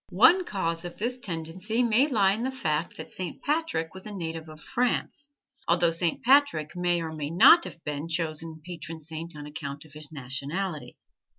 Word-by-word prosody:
One 295 - +6
cause 165 - -2
of 175 -1 -7
this 245 +4 -2
tendency 185 +5 -2
may 240 +4 +4
lie 200 -8 +3
in 215 - -3
the 255 - 0
fact 165 -10 -2
that - - -8
Saint 180 -3 -5
Patrick 295 - -1
was 190 +2 -8
a - - -6
native 165 -4 -5
of 155 0 -11
France; 265 - -1 0.3
although 170 0 +4
Saint 165 0 -1
Patrick 250 - +4
may 175 -1 +1
or 160 -1 -4
may 150 -2 -4
not 255 - +7
have 170 - -9
been 150 +1 -3
chosen 160 -1 -3
patron 165 -2 -7
saint 160 +1 -6
on 145 -1 -8
account 145 0 -6
of 150 - -16
his 150 -1 -3
nationality. 145 +5 -3
170 Hz, 185 wpm, -27 LUFS, 155-210 Hz, 0.3 s, not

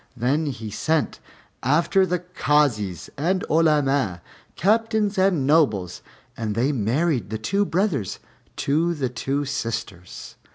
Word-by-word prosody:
Then 140 +7 +1
he 115 -6 -5
sent 155 +8 -1 0.4
after 170 +7 +3
the 180 - 0
Kazis 145 - 0
and 180 +6 0
Olema, 145 - +2 0.3
Captains 215 +1 +1
and 185 -8 +2
Notables, 130 - +2 0.3
and 110 -2 -3
they 125 +6 +2
married 125 - 0
the 110 - -3
two 195 - 0
brothers 170 - -1 0.4
to 165 +5 +1
the 135 -4 -1
two 135 +4 -2
sisters. 115 -9 -5
145 Hz, 120 wpm, -23 LUFS, 115-170 Hz, 0.4 s, after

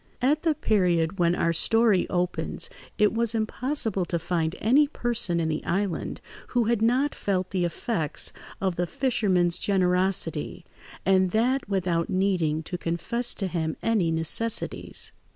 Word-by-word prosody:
At 290 +5 +2
the 320 -2 +1
period 180 - +1
when 170 0 +3
our 170 -1 +1
story 225 +1 +2
opens, 180 -1 -2 0.3
it 210 -1 +3
was 230 0 +1
impossible 225 -2 0
to 170 - 0
find 165 0 -1
any 275 +7 +4
person 235 - -1
in 165 - 0
the 155 -1 -2
island 195 0 -2 0.3
who 245 -1 +1
had 230 -1 0
not 255 +6 +2
felt 185 -2 -2
the 185 -2 0
effects 170 - -2 0.3
of 190 -3 -1
the 175 0 0
fisherman's 185 -8 +1
generosity, 185 -1 +1 0.4
and 190 -1 +4
that 255 +1 +1
without 180 -4 0
needing 185 -5 0
to 180 +3 -5
confess 205 +10 -2
to 195 - -2
him 165 -3 -2
any 210 -7 +2
necessities. 165 +8 0
190 Hz, 145 wpm, -26 LUFS, 175-230 Hz, 0.4 s, any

